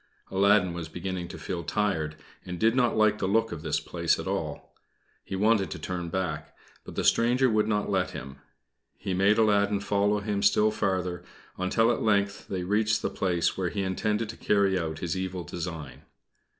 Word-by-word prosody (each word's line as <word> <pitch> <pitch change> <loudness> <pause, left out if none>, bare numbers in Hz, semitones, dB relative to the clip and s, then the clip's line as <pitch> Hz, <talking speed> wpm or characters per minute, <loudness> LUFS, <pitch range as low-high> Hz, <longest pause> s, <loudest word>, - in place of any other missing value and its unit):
Aladdin 100 -1 +4
was 85 -2 -6
beginning 90 +1 -4
to - - -8
feel 85 -2 -4
tired, 80 -7 -1 0.3
and 90 - -6
he - - -7
did 115 +5 +3
not 125 -3 +2
like 110 -1 +3
the 95 - 0
look 110 +3 +2
of 80 - -5
this 75 -2 0
place - - 0
at - - -5
all. - - -4 0.5
He - - -5
wanted 105 0 +2
to - - -5
turn 90 -2 -4
back; 85 -4 -3 0.3
but - - -10
the - - -1
stranger 125 +2 +3
would 105 -1 +2
not 105 -1 0
let 95 -2 +1
him. 70 -2 -8 0.6
He 95 - -3
made 100 +3 +3
Aladdin 105 -2 +3
follow 100 +1 +1
him 105 -1 -2
still 105 +1 +4
farther, 95 -4 -1 0.3
until 115 +5 +2
at 120 - -1
length 100 -2 +1
they 95 -2 -3
reached 105 +3 +1
the - - -1
place 90 -3 0
where 90 -2 -1
he 100 -2 -2
intended 105 +4 -1
to 115 - -7
carry 100 -2 +2
out 80 -3 -2
his 85 +2 -3
evil 95 -1 -3
design. 80 -3 -6
95 Hz, 190 wpm, -27 LUFS, 90-105 Hz, 0.6 s, Aladdin